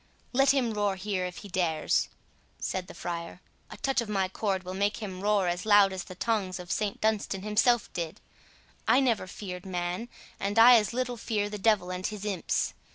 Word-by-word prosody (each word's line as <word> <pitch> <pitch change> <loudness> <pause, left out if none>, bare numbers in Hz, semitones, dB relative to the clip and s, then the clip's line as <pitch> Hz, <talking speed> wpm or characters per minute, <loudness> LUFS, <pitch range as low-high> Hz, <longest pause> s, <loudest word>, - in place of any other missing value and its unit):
"Let 270 +2 +4
him 255 -5 +2
roar 205 -2 0
here 190 -1 -2
if 180 - -9
he - - -6
dares," 175 -5 0 0.5
said 185 -1 -3
the - - -11
friar; 170 0 -5 0.3
"a - - -9
touch 270 -2 +1
of 230 - -6
my 195 -3 0
cord 190 -1 -1
will 185 0 -6
make 200 +2 0
him 190 -4 -6
roar 205 -2 +2
as 175 +1 -1
loud 205 -2 +5
as 185 -2 -5
the 185 - -10
tongs 195 -3 -1
of 180 0 -8
St 210 -2 -1
Dunstan 210 -3 0
himself 225 +3 +2
did. 170 -3 -4 0.7
I - - +6
never 235 -8 +1
feared 180 -1 -7
man, 180 +4 -3 0.3
and 200 +2 -2
I 240 +2 +9
as 210 -3 +1
little 245 0 -2
fear 205 -2 -2
the 210 - -5
devil 195 -3 +2
and 185 0 -2
his 210 -1 -6
imps. 195 -5 -1
200 Hz, 200 wpm, -28 LUFS, 185-220 Hz, 0.7 s, I